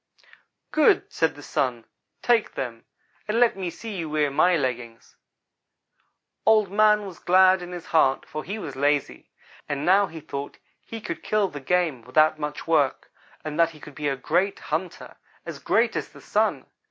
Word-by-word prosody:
"'Good,' 310 -1 +3
said 160 -1 +1
the 145 - -12
Sun, 120 -5 -2 0.4
'take 235 -3 +2
them, 115 -3 -5 0.4
and 215 +2 0
let 240 -4 +4
me 190 -2 -3
see 220 +4 -8
you 165 -3 -4
wear 150 -2 +1
my 175 +5 +3
leggings.' 125 -4 -5 1.3
"Old 215 -3 +4
man 210 0 +4
was 185 -4 -9
glad 185 +1 +5
in 175 0 -8
his 175 -2 -7
heart, 135 -5 +2
for 155 0 -6
he 200 +3 -5
was 155 -10 -7
lazy, 145 +1 -1 0.4
and 145 -1 -2
now 195 +2 +4
he 165 - -9
thought 140 -1 -7 0.3
he 225 -1 -8
could - - -5
kill 210 -2 +1
the 145 - -8
game 160 -3 0
without 155 +6 +2
much 150 -1 -5
work, 150 -5 +1 0.3
and 155 +1 -5
that 165 -1 +5
he 155 -2 -15
could 150 - -12
be 150 +1 -3
a 140 - 0
great 175 +8 0
hunter 165 +3 -5 0.3
as - - -7
great - - +1
as - - -3
the - - -15
Sun. - - 0
160 Hz, 175 wpm, -24 LUFS, 145-190 Hz, 1.3 s, glad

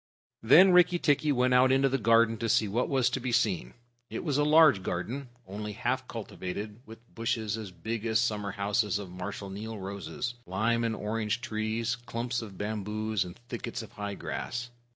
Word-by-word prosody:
Then 165 +12 +7
Rikki 180 0 +6
tikki 150 -2 +2
went 125 -1 +2
out 130 +1 +5
into 135 +1 +4
the 135 0 0
garden 115 0 +4
to 115 - -1
see 110 0 +3
what 115 +5 0
was 130 -3 +2
to - - -1
be 125 0 -3
seen. 105 - 0 0.3
It - - -5
was 145 -4 0
a - - +4
large 150 -7 +6
garden, 120 +10 -4 0.2
only 105 +2 -5
half 125 +4 -2
cultivated, 105 -1 -6
with 115 +2 -14
bushes, 110 -2 -1
as 110 -3 -6
big 110 +6 -4
as 110 0 +2
summer 105 -3 -1
houses, 105 0 0
of 100 -3 -7
Marshal 95 +2 -6
Niel 110 +3 -6
roses, 100 +5 -5
lime 110 +6 +1
and 115 -1 0
orange 110 +2 -2
trees, 110 +2 -1
clumps 120 0 -3
of 100 -4 -9
bamboos, 105 0 -2
and 90 -1 -10
thickets 120 -1 -5
of 110 - -12
high 105 -3 -5
grass. 120 +4 -5
115 Hz, 185 wpm, -29 LUFS, 105-125 Hz, 0.3 s, Then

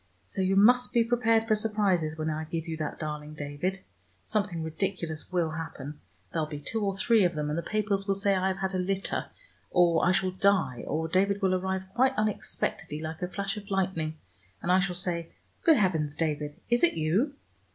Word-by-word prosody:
So 195 - -2
you 190 +1 +2
must 245 +5 +5
be 235 - +5
prepared 230 -1 +2
for 220 - +4
surprises 200 -7 +1
when 155 0 -1
I 155 +1 -3
give 165 +1 -4
you 165 - -3
that 155 -1 -3
darling 150 0 -5
David. 150 +6 -3 0.4
Something 200 -6 -1
ridiculous 160 -1 -3
will 170 -3 +1
happen. 150 -2 -6 0.3
There'll 160 -2 0
be 150 -1 -6
two 215 +9 -2
or 195 -1 -1
three 220 +1 +4
of 175 -2 +2
them, 150 -1 -1
and - - -1
the 170 - -1
papers 200 +1 -1
will 195 - +2
say 195 0 +2
I 190 0 +1
have 190 0 -1
had 190 0 -2
a 185 - 0
litter, 195 +1 -1 0.4
or 170 -2 +4
I 180 - +5
shall 185 0 +2
die, 185 -10 +2
or 160 +2 -1
David 195 +4 +2
will 190 -1 +3
arrive 190 +1 -1
quite 260 +3 +3
unexpectedly 215 -7 -2
like 160 0 -6
a 180 - -1
flash 195 +2 -3
of 205 -1 -9
lightning, 180 -5 -1 0.4
and 175 - -1
I 185 - +6
shall 180 -1 0
say, 175 -2 -3 0.3
'Good 325 -4 +6
heavens, 160 -7 +1
David, 150 -2 -2
is 240 +1 +2
it 345 - +4
you?' 190 - +1
185 Hz, 205 wpm, -28 LUFS, 160-200 Hz, 0.4 s, I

